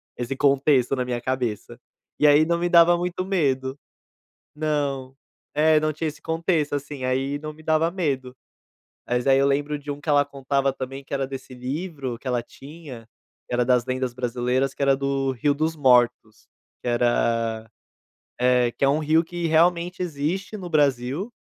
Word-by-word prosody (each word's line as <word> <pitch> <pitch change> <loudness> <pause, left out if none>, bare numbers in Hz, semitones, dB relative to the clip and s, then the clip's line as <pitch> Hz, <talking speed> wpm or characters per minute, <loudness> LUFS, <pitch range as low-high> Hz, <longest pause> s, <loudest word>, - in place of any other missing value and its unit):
esse 125 +2 -4
contexto 135 -1 +3
na 130 - -1
minha 125 -1 -3
cabeça. 120 -2 -3 0.4
E 150 - +5
aí 145 +2 +6
não 170 +1 +1
me 175 +1 0
dava 170 0 +6
muito 180 +1 -3
medo. 135 -8 0 0.8
Não. 140 -4 -2 0.4
É, 155 +1 +4
não 155 0 0
tinha 160 +2 -3
esse 150 0 -8
contexto, 160 -2 0
assim, 140 -1 -5
aí 135 +2 -1
não 155 +1 -7
me 155 - -16
dava 160 +1 +2
medo. 135 -8 -3 0.7
Mas 125 0 0
aí 135 -1 +5
eu 140 - +3
lembro 145 +2 0
de 145 0 -11
um 145 0 -4
que 155 - -6
ela 145 -1 +4
contava 140 -1 -1
também, 135 +1 -6
que - - -10
era 135 -1 0
desse 130 -1 -8
livro 135 -1 -5
que 135 - -9
ela 125 -1 0
tinha, 135 -3 -12 0.4
que - - -7
era 125 0 +2
das 125 -1 +2
lendas 130 -1 -2
brasileiras, 125 +2 -1
que - - -9
era 140 -1 +4
do 135 -1 -1
Rio 135 +4 +1
dos 155 +3 -1
Mortos, 120 -5 +2 0.4
que - - -6
era, 115 -2 0 0.7
eh, 125 -1 +3
que 135 - 0
é - - +4
um 145 +2 +2
rio 160 +2 +3
que 175 0 -4
realmente 170 +2 +2
existe 175 +5 -3
no 180 -3 -7
Brasil, 145 - 0
140 Hz, 180 wpm, -24 LUFS, 130-155 Hz, 0.8 s, aí